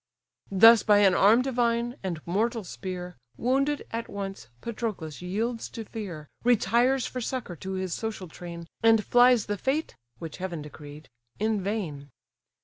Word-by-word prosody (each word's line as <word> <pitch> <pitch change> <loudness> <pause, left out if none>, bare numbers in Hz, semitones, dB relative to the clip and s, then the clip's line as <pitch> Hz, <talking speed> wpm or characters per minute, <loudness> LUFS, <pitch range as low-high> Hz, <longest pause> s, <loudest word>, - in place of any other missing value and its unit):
Thus, 225 +4 +8
by 210 -1 +4
an 195 -2 +5
arm 220 +7 +5
divine, 240 -2 0
and 170 -5 -4
mortal 220 +5 0
spear, 180 -2 -6 0.2
Wounded, 275 +4 +1
at 230 0 -4
once, 195 - -6
Patroclus 210 - -5
yields 225 +6 -2
to 225 - -7
fear, 185 -10 -7 0.2
Retires 245 +2 +3
for 250 - -4
succour 240 -6 -4
to 190 +5 -5
his 185 -2 -2
social 220 -4 -4
train, 170 +1 -9 0.2
And 225 -2 +4
flies 245 -2 +5
the 205 -1 -3
fate, 285 - -1 0.2
which 160 +4 -7
heaven 180 -4 -4
decreed, 150 0 -11 0.3
in 215 -1 0
vain. 180 -9 -4
210 Hz, 145 wpm, -27 LUFS, 180-235 Hz, 0.3 s, Thus